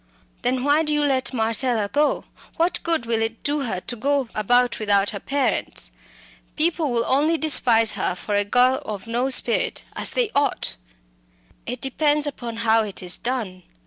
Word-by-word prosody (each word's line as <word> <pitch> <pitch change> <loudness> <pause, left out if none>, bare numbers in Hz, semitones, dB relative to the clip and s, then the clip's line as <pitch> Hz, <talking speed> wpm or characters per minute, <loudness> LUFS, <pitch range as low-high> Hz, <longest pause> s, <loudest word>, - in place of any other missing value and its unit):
"Then 255 +1 0
why 290 +2 +3
do 300 -1 -2
you 295 0 +1
let 270 -2 +1
Marcella 230 -2 +1
go? 290 +9 0 0.3
What 345 +1 +1
good 330 -7 +1
will 230 -1 0
it 225 0 -3
do 290 0 0
her 220 -9 -2
to 240 - -5
go 275 +1 -1
about 245 +4 +2
without 205 -2 +2
her 200 - -5
parents? 280 +4 -2 0.6
People 320 -2 +1
will 235 -1 0
only 305 +5 +2
despise 235 -8 +4
her 180 - -1
for 205 +3 -5
a 205 0 +2
girl 250 +6 +3
of 205 -6 -6
no 240 +3 -1
spirit 245 -3 +1
as - - +1
they 480 -4 0
ought." 285 0 0 0.9
"It 245 0 -5
depends 295 +2 +1
upon 240 -5 -5
how 225 0 +4
it 200 -3 -4
is 180 -1 -3
done. 225 -7 -4
250 Hz, 175 wpm, -22 LUFS, 225-290 Hz, 0.9 s, despise